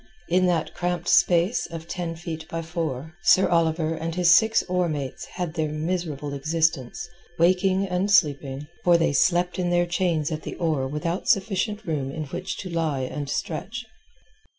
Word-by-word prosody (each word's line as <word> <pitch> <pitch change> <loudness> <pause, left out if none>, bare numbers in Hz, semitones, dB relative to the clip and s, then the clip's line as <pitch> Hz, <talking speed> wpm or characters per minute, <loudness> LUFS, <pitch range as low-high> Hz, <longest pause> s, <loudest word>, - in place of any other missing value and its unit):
In 180 +1 +3
that 170 -3 0
cramped 175 -1 -2
space 175 +5 +3
of 165 -1 -8
ten 170 -2 -4
feet 160 -1 -6
by 165 0 -3
four, 160 -3 -4
Sir 185 +2 +5
Oliver 165 -1 +1
and 165 +1 -4
his 175 -1 +4
six 220 +5 +5
oar 180 -1 0
mates 140 -4 -4
had 175 -3 -3
their 160 -2 -1
miserable 155 -3 -3
existence, 160 +1 -1 0.3
waking 185 +3 +3
and 185 +1 -1
sleeping—for 150 0 +2
they 165 -3 +1
slept 175 +5 +2
in 175 -1 0
their 175 0 +3
chains 175 -3 0
at 155 0 -3
the - - -6
oar 155 -6 0
without 160 +6 -3
sufficient 205 +2 +1
room 145 -6 -2
in 155 +3 -4
which 140 - -5
to 185 - -6
lie 160 -5 -1
at 145 +2 -4
stretch. 215 +12 -4
170 Hz, 165 wpm, -25 LUFS, 155-180 Hz, 0.3 s, Sir